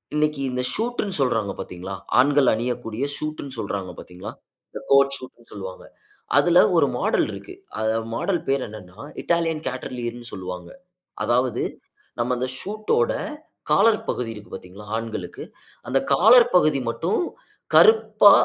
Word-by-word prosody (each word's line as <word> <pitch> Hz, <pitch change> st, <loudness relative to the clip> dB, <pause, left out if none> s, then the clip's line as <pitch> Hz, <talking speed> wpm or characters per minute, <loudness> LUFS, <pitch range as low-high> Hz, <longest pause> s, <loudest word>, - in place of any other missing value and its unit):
இன்னைக்கு 150 Hz, -1 st, +1 dB
இந்த 125 Hz, -, -1 dB
ஷூட்னு 225 Hz, -4 st, -1 dB
சொல்றாங்க 110 Hz, -6 st, +1 dB
பார்த்தீங்களா? 90 Hz, +2 st, -6 dB, 0.2 s
ஆண்கள் 140 Hz, 0 st, +5 dB
அணியக்கூடிய 120 Hz, +1 st, -2 dB
ஷூட்னு 155 Hz, -3 st, -5 dB
சொல்றாங்க 100 Hz, -3 st, -3 dB
பார்த்தீங்களா, 90 Hz, 0 st, -9 dB, 0.4 s
இந்த -, -, -7 dB
கோட் 140 Hz, 0 st, +5 dB
ஷூட்னு 125 Hz, -2 st, -14 dB
சொல்வாங்க. 95 Hz, -2 st, -8 dB, 0.5 s
அதுல -, -, +5 dB, 0.2 s
ஒரு -, -, +5 dB
மாடல் -, -, +2 dB
இருக்கு. -, -, -9 dB, 0.6 s
மாடல் 180 Hz, +7 st, 0 dB
பெயர் 135 Hz, -1 st, +1 dB
என்னன்னா 105 Hz, -2 st, -12 dB, 0.2 s
இட்டாலியன் 165 Hz, -2 st, 0 dB
கேட்டர்லியர்னு 120 Hz, -2 st, -5 dB
சொல்வாங்க. 90 Hz, -2 st, -6 dB, 0.5 s
அதாவது, 125 Hz, 0 st, +1 dB, 0.6 s
நம்ம 120 Hz, +2 st, +1 dB
அந்த 130 Hz, -, -1 dB
ஷூட் 215 Hz, +2 st, -5 dB
ஓட 120 Hz, -, +2 dB, 0.6 s
காலர் 225 Hz, -1 st, +5 dB
பகுதி 120 Hz, -2 st, -2 dB
இருக்கு 105 Hz, +1 st, -12 dB
பார்த்தீங்களா, 100 Hz, +3 st, -11 dB
ஆண்களுக்கு 115 Hz, -1 st, -5 dB, 0.5 s
அந்த 135 Hz, -, +2 dB, 0.2 s
காலர் 230 Hz, -, +7 dB
பகுதி 155 Hz, -6 st, +4 dB
மட்டும் 115 Hz, +11 st, -1 dB, 0.6 s
கருப்பா 445 Hz, -1 st, +7 dB
125 Hz, 125 wpm, -23 LUFS, 110-155 Hz, 0.6 s, காலர்